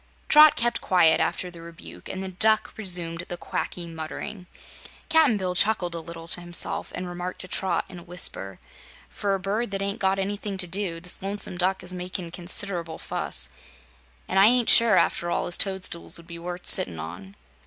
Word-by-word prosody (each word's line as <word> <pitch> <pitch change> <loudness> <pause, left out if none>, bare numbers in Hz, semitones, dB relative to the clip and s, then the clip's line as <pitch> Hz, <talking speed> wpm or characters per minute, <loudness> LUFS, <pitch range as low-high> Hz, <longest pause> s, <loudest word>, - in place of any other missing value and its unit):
Trot 305 0 +8
kept 240 0 0
quiet, 165 -3 +4
after 180 - -1
the 170 -1 -12
rebuke, 170 +2 -11
and 190 - -4
the - - -3
Duck 215 +4 +1
resumed 175 -5 -2
the 175 - -5
quacky 175 0 -4
muttering. 170 +4 -7 0.6
Cap'n 310 -9 +4
Bill 185 -2 -2
chuckled 180 -2 +2
a 170 - -3
little 165 0 -9
to 175 - -2
himself 175 0 -1
and 180 - -5
remarked 175 +1 -6
to 185 - -9
Trot 190 +1 -1
in 180 - -10
a - - -13
whisper: 165 - -4 0.5
"For 200 -1 -1
a - - -4
bird 205 +5 -2
that 195 0 -4
ain't 200 0 -2
got 190 0 +1
anything 200 +1 -3
to 185 - -2
do, 180 -1 -2
this 180 +1 -4
Lonesome 195 -1 +1
Duck 185 +1 +1
is 180 0 -4
makin' 180 -1 -5
consider'ble 175 -2 -2
fuss. 60 - +3 0.8
An' - - +1
I 195 - +8
ain't 245 0 +4
sure, 230 -4 +7
after 175 - +1
all, 170 - -1
as 175 - +2
toadstools 190 -3 -1
would 170 - -11
be 170 0 -10
worth 175 +1 -7
sittin' 85 -3 +4
on." 90 +5 -9
180 Hz, 190 wpm, -25 LUFS, 170-195 Hz, 0.8 s, Trot